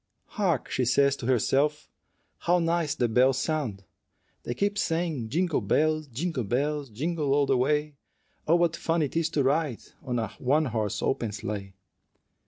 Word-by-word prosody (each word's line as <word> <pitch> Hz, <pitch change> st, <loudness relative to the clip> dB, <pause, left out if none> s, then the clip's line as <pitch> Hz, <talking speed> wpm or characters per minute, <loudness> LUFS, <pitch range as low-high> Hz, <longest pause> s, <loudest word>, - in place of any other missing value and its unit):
"Hark!" 180 Hz, -, 0 dB
she 130 Hz, -, +1 dB
says 140 Hz, +3 st, +3 dB
to 120 Hz, -, -5 dB
herself, 140 Hz, +5 st, +1 dB, 0.5 s
"how 175 Hz, +1 st, +2 dB
nice 165 Hz, -3 st, 0 dB
the 120 Hz, -, +1 dB
bells 125 Hz, +3 st, +3 dB
sound! 130 Hz, -11 st, -2 dB, 0.6 s
They 120 Hz, -, -4 dB
keep 205 Hz, +1 st, 0 dB
saying, 160 Hz, -, -1 dB
'Jingle 165 Hz, +4 st, +1 dB
bells, 155 Hz, 0 st, +1 dB
jingle 140 Hz, +1 st, -3 dB
bells, 140 Hz, +5 st, -1 dB
Jingle 150 Hz, +5 st, -2 dB
all 145 Hz, -1 st, +3 dB
the 135 Hz, -1 st, +2 dB
way; 150 Hz, +3 st, 0 dB, 0.5 s
Oh, 165 Hz, -, +5 dB
what 170 Hz, -1 st, +2 dB
fun 165 Hz, -1 st, 0 dB
it 145 Hz, -, -4 dB
is 165 Hz, -1 st, +1 dB
to 145 Hz, -, +1 dB
ride 140 Hz, -2 st, 0 dB, 0.2 s
In 125 Hz, -1 st, -1 dB
a 110 Hz, -3 st, -1 dB
one 145 Hz, +5 st, +2 dB
horse 110 Hz, -5 st, -2 dB
open 115 Hz, -5 st, 0 dB
sleigh!' 100 Hz, -2 st, -5 dB
145 Hz, 165 wpm, -27 LUFS, 125-160 Hz, 0.6 s, Oh